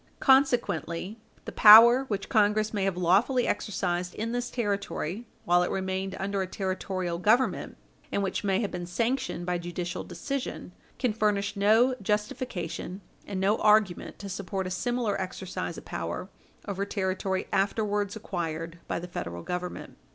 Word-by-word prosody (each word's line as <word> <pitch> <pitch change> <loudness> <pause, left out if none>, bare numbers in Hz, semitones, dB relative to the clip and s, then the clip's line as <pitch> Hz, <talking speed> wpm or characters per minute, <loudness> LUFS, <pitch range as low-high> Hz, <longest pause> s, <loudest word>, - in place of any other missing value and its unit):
Consequently, 230 - +2 0.3
the - - -5
power 235 +5 +9
which 205 -6 -3
Congress 215 0 +2
may 200 -2 0
have 195 -2 -1
lawfully 205 +9 +3
exercised 180 -3 -2
in 225 +2 -3
this 245 0 -2
Territory, 205 -2 -3 0.2
while 175 +1 +4
it 180 - 0
remained 190 0 -2
under 195 0 -1
a 190 - -2
Territorial 185 -2 -3
Government, 220 +8 +1 0.3
and 200 - 0
which 195 - -2
may 195 0 +1
have 205 - -2
been 175 -1 -5
sanctioned 225 -1 -1
by 180 0 -1
judicial 175 0 -4
decision, 275 -2 -5 0.3
can 250 -5 0
furnish 210 -1 0
no 220 +6 +4
justification 205 -3 -3 0.3
and 195 -2 -3
no 200 +3 +2
argument 210 -4 +2
to 205 - -8
support 195 0 -4
a 185 - -4
similar 235 0 -1
exercise 185 0 -5
of - - -10
power - - -4 0.4
over 200 -1 -2
territory 190 -1 -2
afterwards 205 +1 0
acquired 165 -5 -4
by - - -2
the 175 - -6
Federal 85 - -6
Government. 180 0 -5
200 Hz, 150 wpm, -28 LUFS, 180-215 Hz, 0.4 s, power